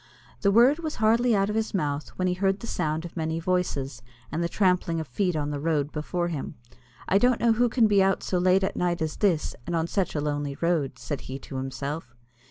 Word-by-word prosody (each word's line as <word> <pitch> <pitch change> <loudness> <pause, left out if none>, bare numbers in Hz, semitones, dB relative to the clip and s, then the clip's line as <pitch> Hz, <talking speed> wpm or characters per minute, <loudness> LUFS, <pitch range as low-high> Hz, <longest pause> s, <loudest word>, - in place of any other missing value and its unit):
The 200 - +3
word 245 +8 +5
was 315 -2 -4
hardly 230 +2 +3
out 200 +1 +1
of - - -3
his 220 -1 -1
mouth, 145 -4 -1
when 185 - 0
he 180 - +1
heard 195 +2 0
the - - -6
sound 160 -6 -2
of 170 - -9
many 160 -1 -2
voices, 155 -7 -1 0.3
and 170 - -1
the 170 - -1
trampling 180 -3 +1
of 160 - -5
feet 180 +7 0
on 150 -1 -1
the 145 - -3
road 150 -1 0
before 175 +3 -2
him. 150 -5 -5 0.5
"I 195 - +4
don't 245 +1 +3
know 235 -1 +4
who 240 +2 +2
can 235 -1 +3
be 205 -2 +4
out 195 0 +2
so 180 - 0
late 185 +2 +3
at 195 - -1
night 175 -1 0
as 155 - -3
this, 180 -7 +1
and 170 - -1
on 165 -1 +1
such 185 0 -1
a - - +1
lonely 145 -1 -2
road," 160 -6 0
said 145 +1 -5
he 130 - -4
to 135 0 -8
himself. 135 0 -5
175 Hz, 235 wpm, -26 LUFS, 150-195 Hz, 0.5 s, word